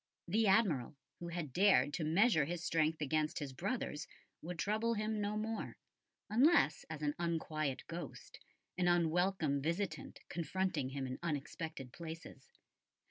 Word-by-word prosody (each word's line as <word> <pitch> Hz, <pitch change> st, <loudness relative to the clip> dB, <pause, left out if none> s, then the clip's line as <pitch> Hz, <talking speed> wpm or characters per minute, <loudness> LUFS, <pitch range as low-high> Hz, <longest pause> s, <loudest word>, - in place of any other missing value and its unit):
The 215 Hz, +5 st, +3 dB
Admiral, 185 Hz, -, +3 dB, 0.2 s
who 170 Hz, -, -5 dB
had 170 Hz, -6 st, -4 dB
dared 180 Hz, -8 st, +5 dB
to 165 Hz, -, -1 dB
measure 165 Hz, 0 st, +4 dB
his 170 Hz, +2 st, -4 dB
strength 160 Hz, -1 st, +1 dB
against 155 Hz, +1 st, 0 dB
his 140 Hz, -3 st, -4 dB
brother's, 180 Hz, -, -3 dB, 0.3 s
would 175 Hz, +2 st, -5 dB
trouble 220 Hz, +5 st, +1 dB
him 215 Hz, 0 st, -1 dB
no 205 Hz, +1 st, -1 dB
more, 220 Hz, +1 st, -3 dB, 0.5 s
unless 240 Hz, -, +4 dB
as 155 Hz, -1 st, -5 dB
an 145 Hz, 0 st, +1 dB
unquiet 155 Hz, -4 st, -1 dB
ghost, 170 Hz, +1 st, -8 dB, 0.4 s
an 180 Hz, -, +3 dB
unwelcome 175 Hz, -3 st, +2 dB
visitant 170 Hz, +7 st, -2 dB
confronting 170 Hz, -4 st, -1 dB
him 135 Hz, 0 st, -3 dB
in 130 Hz, 0 st, -5 dB
unexpected 150 Hz, -4 st, -4 dB
places. 160 Hz, -5 st, -9 dB
165 Hz, 135 wpm, -36 LUFS, 150-195 Hz, 0.5 s, dared